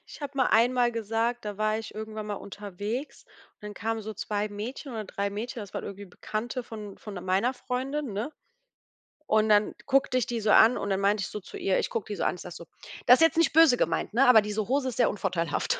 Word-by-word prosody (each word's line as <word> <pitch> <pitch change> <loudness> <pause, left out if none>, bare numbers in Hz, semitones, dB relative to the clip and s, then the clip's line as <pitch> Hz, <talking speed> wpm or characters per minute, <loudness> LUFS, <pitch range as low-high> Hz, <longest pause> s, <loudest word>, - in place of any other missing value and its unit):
Ich - - -12
habe 280 -1 -6
mal 260 - +3
einmal 240 +1 +3
gesagt 230 +1 -1
da 205 -1 -5
war 215 0 +1
ich 225 - -8
irgendwann 215 0 -6
mal 205 - -3
unterwegs 205 +7 -6 0.3
und - - -44
dann 210 0 -7
kamen 225 +1 -2
so 215 0 -6
2 210 0 -2
Mädchen 240 +6 -6
oder 220 -2 -4
3 200 +1 -3
Mädchen, 225 +3 -5
das 200 -2 -10
waren - - -4
irgendwie 200 +1 -7
Bekannte 230 +7 -4
von 210 -4 -9
von 210 - -9
meiner 195 +8 +1
Freundin, 260 +1 -3
ne? 215 +9 -3 1.0
Und 215 0 +3
dann 210 0 +3
guckte 270 -2 +2
ich 250 - +1
die 235 -1 -3
so 215 - 0
an 225 +4 +7
und 200 - -3
dann 195 0 +1
meinte 200 +1 +2
ich 175 - -2
so 210 - -6
zu 190 - -10
ihr 190 - +1
ich - - -1
gucke 225 -3 -3
die 205 - -4
so - - -3
an, - - +1
ich - - -11
sag 180 - -8
so: 170 - -10 0.4
„Das 250 - +9
ist - - -2
jetzt 325 - +1
nicht 330 -4 +3
böse 315 -5 +7
gemeint, - - -1
ne, 255 +4 +4
aber 235 -3 +8
diese 210 0 -3
Hose 260 0 +1
ist 245 - -7
sehr 245 - +4
unvorteilhaft.“ 185 -5 -1
220 Hz, 245 wpm, -27 LUFS, 205-245 Hz, 1.0 s, Das